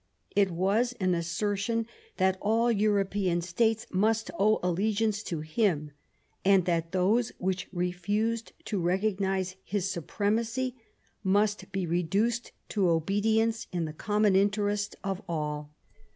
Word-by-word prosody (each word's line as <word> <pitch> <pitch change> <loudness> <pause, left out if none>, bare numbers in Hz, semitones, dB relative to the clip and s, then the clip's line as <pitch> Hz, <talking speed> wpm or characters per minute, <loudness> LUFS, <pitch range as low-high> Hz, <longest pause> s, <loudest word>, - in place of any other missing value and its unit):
It 200 -1 +4
was 200 +8 +1
an 185 -2 +2
assertion 205 +6 -1 0.3
that 190 0 +2
all 225 +3 +2
European 200 -4 +1
States 220 +6 +1
must 220 +1 +1
owe 215 +2 +4
allegiance 205 +4 +1
to 165 -7 -4
him, 155 -2 0 0.5
and 190 -2 +5
that 165 -2 0
those 205 +6 +2
which 185 0 -2
refused 205 +6 -1
to 205 -3 -1
recognise 190 0 0
his 195 -1 -1
supremacy 225 +8 -1 0.5
must 205 +1 +1
be 190 -1 -1
reduced 195 +8 0 0.2
to 195 -4 +2
obedience 220 +7 +1
in 175 -2 -1
the 155 - -5
common 210 +3 +2
interest 205 +1 +1
of 195 0 -2
all. 150 -2 -3
195 Hz, 125 wpm, -29 LUFS, 180-215 Hz, 0.5 s, and